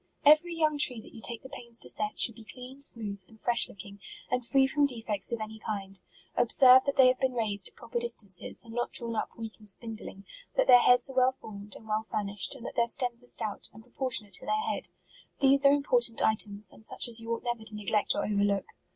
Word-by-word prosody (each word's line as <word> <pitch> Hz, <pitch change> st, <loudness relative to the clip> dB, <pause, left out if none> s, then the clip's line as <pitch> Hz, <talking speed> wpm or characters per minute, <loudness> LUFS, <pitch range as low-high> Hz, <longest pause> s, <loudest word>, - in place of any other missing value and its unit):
Every 310 Hz, +4 st, +5 dB
young 310 Hz, -2 st, +1 dB
tree 255 Hz, -5 st, +2 dB
that -, -, -14 dB
you 225 Hz, -, -11 dB
take 230 Hz, 0 st, -2 dB
the -, -, -9 dB
pains 235 Hz, -2 st, -5 dB
to -, -, 0 dB
set, 210 Hz, 0 st, -3 dB
should 230 Hz, -, +5 dB
be 225 Hz, -, -14 dB
clean, 255 Hz, +4 st, -11 dB
smooth, 210 Hz, -7 st, +1 dB
and 220 Hz, -, -19 dB
fresh 240 Hz, 0 st, +4 dB
looking, 200 Hz, +1 st, -12 dB, 0.3 s
and 250 Hz, 0 st, 0 dB
free 270 Hz, +3 st, +3 dB
from 285 Hz, +2 st, +2 dB
defects 225 Hz, -6 st, -2 dB
of 235 Hz, -, -2 dB
any 220 Hz, 0 st, -7 dB
kind. 195 Hz, -3 st, -5 dB, 0.4 s
Observe 255 Hz, +2 st, +6 dB
that 280 Hz, -, -1 dB
they 260 Hz, -1 st, +7 dB
have 255 Hz, 0 st, +2 dB
been 260 Hz, -2 st, 0 dB
raised 205 Hz, -5 st, -1 dB
at -, -, -20 dB
pro 235 Hz, -, -13 dB
per 235 Hz, -, -2 dB
distances, 215 Hz, -6 st, -4 dB
and 225 Hz, -1 st, -12 dB
not 240 Hz, +1 st, -2 dB
drawn 230 Hz, -1 st, +1 dB
up -, -, -4 dB
weak 225 Hz, -1 st, -8 dB
and 210 Hz, -1 st, -10 dB
spindling; 215 Hz, -2 st, -7 dB, 0.3 s
that -, -, +3 dB
their 245 Hz, -, +8 dB
heads 245 Hz, +1 st, +4 dB
are -, -, -13 dB
well 255 Hz, 0 st, +4 dB
formed, 205 Hz, -1 st, -10 dB
and 220 Hz, -, -14 dB
well 215 Hz, 0 st, 0 dB
furnished; 205 Hz, 0 st, -3 dB
and 245 Hz, -3 st, -11 dB
that -, -, -7 dB
their 235 Hz, -1 st, +2 dB
stems 240 Hz, 0 st, -1 dB
are -, -, -10 dB
stout, 220 Hz, -4 st, -5 dB
and 220 Hz, +2 st, -14 dB
proportionate 240 Hz, -4 st, -2 dB
to -, -, -11 dB
their 430 Hz, 0 st, 0 dB
head. -, -, -3 dB, 0.5 s
These 275 Hz, 0 st, +4 dB
are -, -, +6 dB
important 245 Hz, -5 st, +2 dB
items, 210 Hz, -1 st, -1 dB
and -, -, -12 dB
such 220 Hz, -, 0 dB
as 235 Hz, -1 st, +2 dB
you 230 Hz, 0 st, -7 dB
ought -, -, -11 dB
never 240 Hz, -2 st, -3 dB
to 215 Hz, -1 st, -2 dB
neglect 210 Hz, 0 st, 0 dB
or -, -, -1 dB
overlook. 200 Hz, -1 st, 0 dB
230 Hz, 235 wpm, -29 LUFS, 215-255 Hz, 0.5 s, their